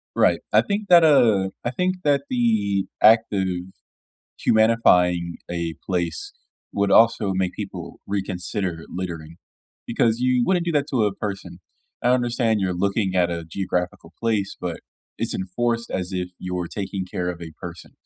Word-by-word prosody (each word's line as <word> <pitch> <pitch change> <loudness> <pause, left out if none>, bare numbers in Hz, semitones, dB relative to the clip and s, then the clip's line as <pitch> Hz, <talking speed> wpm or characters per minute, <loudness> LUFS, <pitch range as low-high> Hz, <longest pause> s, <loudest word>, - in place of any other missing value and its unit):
Right. - - +3
I - - +6
think 205 +1 -3
that, 175 -2 +8
uh, 115 -11 +4
I 120 - -1
think 180 +7 0
that 140 -2 +2
the 105 -5 +1 0.2
act 110 +2 +6
of 95 -2 0 1.0
humanifying 90 -6 +4 0.2
a 85 -1 -3
place 85 -3 -2 0.4
would 100 0 0
also 115 -3 +4
make 95 -1 0
people 95 -4 -7
reconsider 95 -3 -3
littering 85 -3 -6 0.5
because 115 0 +1
you 125 -1 +2
wouldn't 180 -2 +2
do 170 - -1
that 145 -2 +1
to 120 -5 +2
a 105 -2 0
person. 95 -4 -6 0.4
I 120 - +2
understand 120 -3 +2
you're 95 -1 0
looking 100 +1 0
at 90 -1 +2
a 85 -1 -4
geographical 90 -1 -3
place, 110 -4 -1
but 85 -2 -4 0.4
it's - - -1
enforced 115 +5 -2
as 90 -1 -3
if 90 -1 -2
you're 90 -1 -3
taking 95 0 -4
care 90 0 -3
of 90 -1 -5
a 80 -2 -8
person, 85 -1 -9
100 Hz, 155 wpm, -23 LUFS, 90-115 Hz, 1.0 s, that